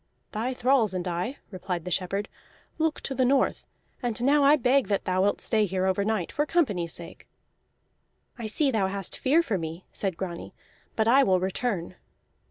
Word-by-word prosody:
"Thy 240 Hz, +4 st, -2 dB
thralls 245 Hz, -6 st, +2 dB
and 180 Hz, 0 st, -2 dB
I," 180 Hz, +10 st, -2 dB
replied 180 Hz, -3 st, -4 dB
the 180 Hz, -, -4 dB
shepherd, 195 Hz, +3 st, -1 dB, 0.5 s
"look 315 Hz, -1 st, 0 dB
to 270 Hz, -, -3 dB
the 260 Hz, 0 st, +1 dB
north. 265 Hz, +1 st, +1 dB, 0.3 s
And 240 Hz, -3 st, -2 dB
now 285 Hz, +2 st, +4 dB
I 285 Hz, +2 st, +7 dB
beg 270 Hz, -1 st, +2 dB
that 200 Hz, -2 st, -1 dB
thou 185 Hz, 0 st, +1 dB
wilt 205 Hz, +1 st, +2 dB
stay 215 Hz, -2 st, +1 dB
here 185 Hz, 0 st, -1 dB
overnight, 200 Hz, 0 st, 0 dB
for 295 Hz, +1 st, 0 dB
company's 205 Hz, -, +1 dB
sake." -, -, -9 dB, 1.1 s
"I 230 Hz, -3 st, -5 dB
see 275 Hz, +6 st, +2 dB
thou 210 Hz, -5 st, +1 dB
hast 195 Hz, -1 st, -4 dB
fear 305 Hz, +6 st, +3 dB
for 205 Hz, -, -1 dB
me," 165 Hz, +2 st, -6 dB
said 190 Hz, -4 st, -2 dB
Grani. 175 Hz, -3 st, -6 dB, 0.4 s
"But 220 Hz, 0 st, +1 dB
I 260 Hz, +4 st, +6 dB
will 190 Hz, -8 st, +3 dB
return." 185 Hz, -1 st, -2 dB
210 Hz, 180 wpm, -27 LUFS, 185-260 Hz, 1.1 s, I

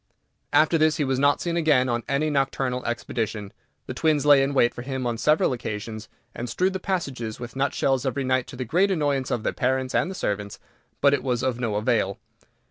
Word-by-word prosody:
After 160 Hz, +1 st, +4 dB
this 155 Hz, +1 st, +3 dB
he 150 Hz, -, +1 dB
was 130 Hz, -1 st, 0 dB
not 145 Hz, +1 st, +3 dB
seen 170 Hz, -1 st, -2 dB
again 150 Hz, -6 st, +3 dB
on 120 Hz, -1 st, 0 dB
any 150 Hz, +3 st, +1 dB
nocturnal 135 Hz, -2 st, -1 dB
expedition. 110 Hz, -3 st, -3 dB, 0.3 s
The -, -, -5 dB
twins 155 Hz, -2 st, +1 dB
lay 145 Hz, -2 st, +7 dB
in 140 Hz, +1 st, 0 dB
wait 120 Hz, -2 st, +4 dB
for -, -, -7 dB
him 130 Hz, 0 st, -4 dB
on 120 Hz, -1 st, -1 dB
several 150 Hz, -1 st, +3 dB
occasions, 110 Hz, -1 st, -6 dB, 0.2 s
and 120 Hz, 0 st, -5 dB
strewed 185 Hz, +10 st, 0 dB
the 190 Hz, -, -3 dB
passages 135 Hz, -, -3 dB
with 120 Hz, 0 st, -8 dB
nutshells 135 Hz, -1 st, 0 dB
every 135 Hz, 0 st, -1 dB
night 130 Hz, -1 st, 0 dB
to -, -, -9 dB
the 130 Hz, 0 st, -4 dB
great 180 Hz, -, +2 dB
annoyance 145 Hz, -7 st, 0 dB
of 115 Hz, -, -1 dB
their -, -, -1 dB
parents 130 Hz, 0 st, -1 dB
and -, -, +1 dB
the 190 Hz, -, -6 dB
servants, 100 Hz, -, -3 dB, 0.4 s
but 140 Hz, 0 st, +5 dB
it -, -, +1 dB
was 125 Hz, -2 st, -1 dB
of 130 Hz, -2 st, -1 dB
no 115 Hz, -4 st, -1 dB
avail. 105 Hz, -3 st, 0 dB
130 Hz, 215 wpm, -25 LUFS, 120-145 Hz, 0.4 s, lay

